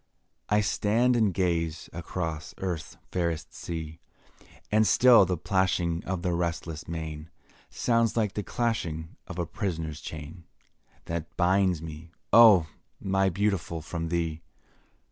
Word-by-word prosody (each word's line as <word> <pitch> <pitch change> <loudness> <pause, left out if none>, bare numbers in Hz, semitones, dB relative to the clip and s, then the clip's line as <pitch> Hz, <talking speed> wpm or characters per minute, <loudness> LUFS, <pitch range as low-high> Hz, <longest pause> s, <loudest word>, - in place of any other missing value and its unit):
I 105 0 +4
stand 115 +4 +2
and 110 -4 +3
gaze 85 -3 -1
across 80 -2 -4
Earth's 90 -5 -4
fairest 85 -3 -2
sea, 80 -1 -6 0.7
And 110 0 +4
still 120 0 +7
the 90 -1 0
plashing 90 -2 0
of 90 -2 -3
the 90 - 0
restless 85 -2 -3
main, 80 -1 -5 0.4
Sounds 115 -1 +1
like 105 -4 +1
the 105 - -2
clashing 90 -8 -2
of 95 - -7
a 85 - -1
prisoner's 80 -5 -4
chain, 80 +3 -8 0.6
That 85 0 -5
binds 90 -2 +2
me, 80 +1 -8 0.2
oh! 110 -8 +8 0.3
my 95 0 +1
Beautiful, 90 -4 -1
from 85 0 -4
thee. 80 -2 -1
85 Hz, 125 wpm, -28 LUFS, 80-100 Hz, 0.7 s, oh